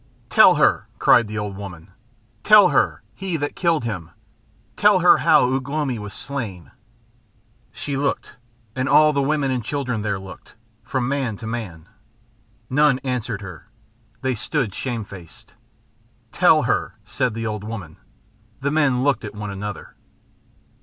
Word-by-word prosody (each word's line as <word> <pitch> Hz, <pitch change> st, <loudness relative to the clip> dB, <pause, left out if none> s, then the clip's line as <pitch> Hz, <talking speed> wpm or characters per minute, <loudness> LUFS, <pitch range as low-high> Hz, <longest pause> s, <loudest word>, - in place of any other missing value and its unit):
"Tell -, -, +7 dB
her," -, -, +2 dB
cried 120 Hz, -2 st, +4 dB
the 105 Hz, +1 st, -6 dB
old 105 Hz, -2 st, -4 dB
woman. 95 Hz, -2 st, -10 dB, 0.5 s
"Tell 210 Hz, -3 st, +7 dB
her -, -, +1 dB
he 190 Hz, -3 st, -4 dB
that 145 Hz, -1 st, -4 dB
killed 170 Hz, -6 st, +1 dB
him. 95 Hz, -8 st, -5 dB, 0.7 s
Tell -, -, +4 dB
her -, -, +6 dB
how 125 Hz, +1 st, +4 dB
Ugh 135 Hz, 0 st, -3 dB
lomi 140 Hz, -5 st, -2 dB
was 105 Hz, -1 st, -7 dB
slain." 110 Hz, -, -5 dB, 1.0 s
She 140 Hz, -, -5 dB
looked, 140 Hz, +1 st, -2 dB, 0.4 s
and 130 Hz, +1 st, -1 dB
all 155 Hz, +1 st, +5 dB
the 140 Hz, -, +1 dB
women 140 Hz, -1 st, 0 dB
and 125 Hz, -2 st, -2 dB
children 125 Hz, -2 st, -3 dB
there 100 Hz, -2 st, -2 dB
looked, 95 Hz, -1 st, -12 dB, 0.3 s
from 130 Hz, -2 st, -2 dB
man 135 Hz, -6 st, -2 dB
to 110 Hz, -, -9 dB
man. 100 Hz, -8 st, -6 dB, 0.8 s
None 140 Hz, +1 st, +3 dB
answered 120 Hz, -5 st, -3 dB
her. 90 Hz, -1 st, -11 dB, 0.5 s
They 130 Hz, -1 st, 0 dB
stood 120 Hz, -, -2 dB
shame 120 Hz, -3 st, -4 dB
faced. 95 Hz, -5 st, -13 dB, 0.8 s
"Tell -, -, +4 dB
her," -, -, -1 dB
said 125 Hz, +1 st, -2 dB
the 115 Hz, 0 st, -4 dB
old 105 Hz, -2 st, -4 dB
woman. 100 Hz, -8 st, -7 dB, 0.6 s
The 140 Hz, +1 st, -1 dB
men 140 Hz, -5 st, +2 dB
looked 140 Hz, -4 st, +1 dB
at 105 Hz, -1 st, -7 dB
one 105 Hz, -1 st, -5 dB
another. 100 Hz, +1 st, -7 dB
120 Hz, 150 wpm, -22 LUFS, 105-140 Hz, 1.0 s, Tell